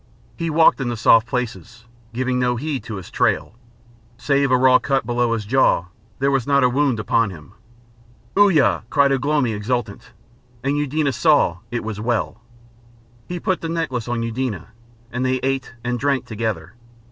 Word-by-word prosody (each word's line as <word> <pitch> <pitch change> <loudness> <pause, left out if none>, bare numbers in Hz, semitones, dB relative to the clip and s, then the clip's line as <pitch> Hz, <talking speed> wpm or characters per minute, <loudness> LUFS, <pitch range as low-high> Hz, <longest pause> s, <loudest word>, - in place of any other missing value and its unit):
He 165 -1 -3
walked 160 -2 +4
in 125 - -1
the 120 - -3
soft 115 +1 +5
places, 120 -1 -5 0.3
giving 125 +1 -1
no 125 -1 +1
heed 140 +2 -3
to 110 - -6
his 95 -3 -9
trail. - - 0 0.6
Save 140 +2 +1
a 130 - +4
raw 130 0 +5
cut 135 -4 0
below 120 0 0
his 110 -2 -3
jaw 105 -7 +2 0.3
there 140 +1 +1
was 135 -3 0
not 140 -1 +3
a 125 - +4
wound 135 -2 +1
upon 110 +2 +1
him. 80 -5 -12 0.8
"Uya!" 160 - +4
cried 140 -1 +3
Ugh 135 -1 0
lomi 145 -6 +1
exultant, 110 0 -4 0.5
and 140 +2 0
Eudena 145 0 0
saw 145 - +3
it 120 -1 -3
was 110 -1 -5
well. 115 -1 -2 0.9
He 175 0 -4
put 185 +1 -1
the 165 - -4
necklace 130 -9 -2
on 120 -1 -2
Eudena, 115 -6 -3 0.4
and 125 +2 -2
they 130 0 +1
ate 135 -2 -2
and 120 0 -2
drank 135 -1 0
together. 110 -7 -4
125 Hz, 170 wpm, -21 LUFS, 115-140 Hz, 0.9 s, soft